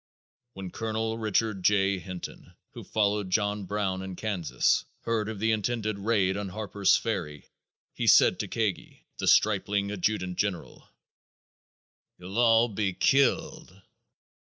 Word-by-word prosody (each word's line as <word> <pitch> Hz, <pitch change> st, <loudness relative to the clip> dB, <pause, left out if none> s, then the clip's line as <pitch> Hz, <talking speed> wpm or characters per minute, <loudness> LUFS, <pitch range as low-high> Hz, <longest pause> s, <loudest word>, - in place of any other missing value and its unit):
When 95 Hz, -2 st, -7 dB
Colonel 110 Hz, 0 st, -3 dB
Richard 110 Hz, -2 st, 0 dB
J. 95 Hz, 0 st, +2 dB
Hinton, 90 Hz, -1 st, -9 dB, 0.2 s
who -, -, -10 dB
followed 105 Hz, -2 st, 0 dB
John 100 Hz, 0 st, 0 dB
Brown 95 Hz, -1 st, -2 dB
in 95 Hz, -1 st, -6 dB
Kansas, 100 Hz, -5 st, 0 dB, 0.2 s
heard 110 Hz, -2 st, -1 dB
of 110 Hz, -, -5 dB
the 110 Hz, +3 st, +1 dB
intended 110 Hz, -1 st, -1 dB
raid 100 Hz, -3 st, +1 dB
on 100 Hz, -1 st, -4 dB
Harper's 100 Hz, 0 st, +1 dB
Ferry, 75 Hz, -10 st, -4 dB, 0.5 s
he -, -, -3 dB
said -, -, +6 dB
to -, -, -2 dB
Kagi, 110 Hz, -5 st, -3 dB
the -, -, -2 dB
stripling 100 Hz, -1 st, +2 dB
adjutant 95 Hz, -2 st, -2 dB
general: 100 Hz, -5 st, -3 dB, 1.3 s
"You'll 95 Hz, +5 st, -5 dB
all 115 Hz, 0 st, +5 dB
be 100 Hz, -3 st, -2 dB
killed." 135 Hz, -7 st, +1 dB
105 Hz, 130 wpm, -27 LUFS, 95-110 Hz, 1.3 s, said